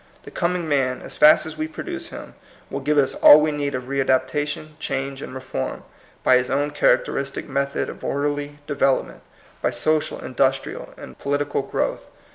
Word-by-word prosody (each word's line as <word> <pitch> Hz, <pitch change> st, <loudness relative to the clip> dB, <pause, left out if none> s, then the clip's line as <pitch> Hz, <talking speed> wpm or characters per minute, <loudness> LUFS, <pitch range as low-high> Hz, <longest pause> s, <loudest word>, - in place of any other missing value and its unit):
The -, -, -11 dB
com 180 Hz, 0 st, 0 dB
ing 175 Hz, -2 st, -3 dB
man, 135 Hz, -4 st, 0 dB
as -, -, -10 dB
fast 155 Hz, +1 st, +6 dB
as 155 Hz, -1 st, -7 dB
we 155 Hz, -, -1 dB
produce 160 Hz, -, -6 dB
him, -, -, -10 dB, 0.4 s
will 140 Hz, -, -2 dB
give 150 Hz, +2 st, 0 dB
us 140 Hz, -2 st, +3 dB
all 150 Hz, -, +8 dB
we 155 Hz, 0 st, +1 dB
need 145 Hz, -2 st, -2 dB
of 130 Hz, -, -3 dB
readaptation, 140 Hz, +3 st, 0 dB
change, 135 Hz, -1 st, -3 dB
and -, -, -7 dB
reform, 130 Hz, -, -5 dB, 0.4 s
by 130 Hz, -, +6 dB
his 125 Hz, 0 st, -1 dB
own 145 Hz, +1 st, 0 dB
characteristic -, -, +1 dB
method 140 Hz, 0 st, -1 dB
of -, -, -9 dB
orderly 145 Hz, 0 st, -2 dB
development, 140 Hz, -2 st, 0 dB, 0.4 s
by -, -, +2 dB
social, 155 Hz, +6 st, 0 dB
indus 135 Hz, +1 st, +2 dB
trial, -, -, -9 dB
and -, -, -11 dB
political 145 Hz, 0 st, -1 dB
growth. 135 Hz, -, -3 dB
140 Hz, 175 wpm, -22 LUFS, 135-150 Hz, 0.4 s, all